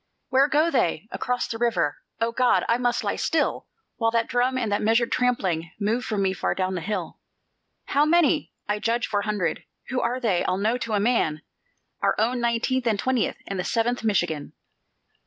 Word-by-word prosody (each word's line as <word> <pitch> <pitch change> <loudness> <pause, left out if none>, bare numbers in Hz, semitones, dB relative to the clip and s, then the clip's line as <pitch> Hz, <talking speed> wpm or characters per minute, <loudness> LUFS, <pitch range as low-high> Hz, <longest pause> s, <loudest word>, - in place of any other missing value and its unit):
"Where 270 +2 +4
go 310 +3 +2
they?" 195 - 0
"Across 250 0 -2
the 225 - -4
river." 225 -11 +1 0.2
"O 230 0 +1
God! 250 +1 +2
and 235 +2 +1
must 245 -1 0
I - - +1
lie - - -1
still, - - 0 0.3
While 225 -1 +2
that 230 0 +1
drum 250 +1 +1
and 225 -5 -1
that 205 - +1
measured 230 +2 +2
trampling 190 -10 0
Move 225 +4 0
from 205 -2 -1
me 190 -1 +1
far - - -1
down 185 0 -1
the 180 - -3
hill? 185 -1 -4 0.7
"How 285 - +2
many?" 320 -1 +3 0.2
"I 205 0 0
judge, 235 +2 0
four 205 -1 -1
hundred." 205 -5 -1 0.3
"Who 255 -1 0
are 245 +2 -1
they? 210 -8 +1
I'll 185 - 0
know 220 +5 0
to 230 -2 -3
a 205 - +2
man." 200 -9 +1 0.6
"Our - - +2
own 240 +3 +1
Nineteenth 240 +2 0
and 215 -3 +2
Twentieth, 255 +2 0
And 195 -1 -4
the - - 0
Seventh 235 +3 0
Michigan." 175 -8 0
230 Hz, 195 wpm, -25 LUFS, 200-245 Hz, 0.7 s, Where